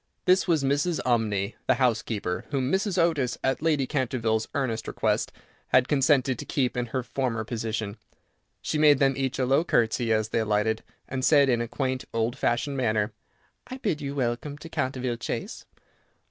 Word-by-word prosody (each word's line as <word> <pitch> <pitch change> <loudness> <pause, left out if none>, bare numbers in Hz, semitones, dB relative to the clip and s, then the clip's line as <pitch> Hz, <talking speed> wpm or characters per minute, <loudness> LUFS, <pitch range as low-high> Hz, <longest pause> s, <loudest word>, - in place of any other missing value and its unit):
This 185 +1 +4
was 160 -5 +2
Mrs. 145 +5 +1
Umney, 110 -4 +1
the 130 - +4
housekeeper, 110 -7 -1
whom 135 -2 -1
Mrs. 190 0 0
Otis, 160 -8 +1
at 130 0 0
Lady 155 -4 +2
Canterville's 115 -5 -1
earnest 120 -6 -1
request, - - 0 0.4
had 125 0 +4
consented 135 -3 +2
to - - -4
keep 130 -4 0
in 125 -1 -1
her 130 +2 -2
former 120 -1 -2
position. 110 -2 -3 0.7
She 155 - -1
made 150 -2 +6
them 135 0 +3
each 135 -1 -2
a 130 - +1
low 135 +5 +3
curtsey 115 -6 +1
as 110 -1 +1
they 115 - 0
alighted, 110 0 +1 0.3
and 130 0 -4
said 140 -1 +5
in 120 -2 +2
a 120 - -2
quaint, 130 +1 -2
old 115 +2 0
fashioned 135 +2 0
manner, 110 -3 0 0.5
"I 255 +1 -6
bid 200 - -2
you 140 0 -4
welcome 130 +2 -2
to 165 - -10
Canterville 130 -5 -2
Chase." - - -5
130 Hz, 175 wpm, -26 LUFS, 115-140 Hz, 0.7 s, made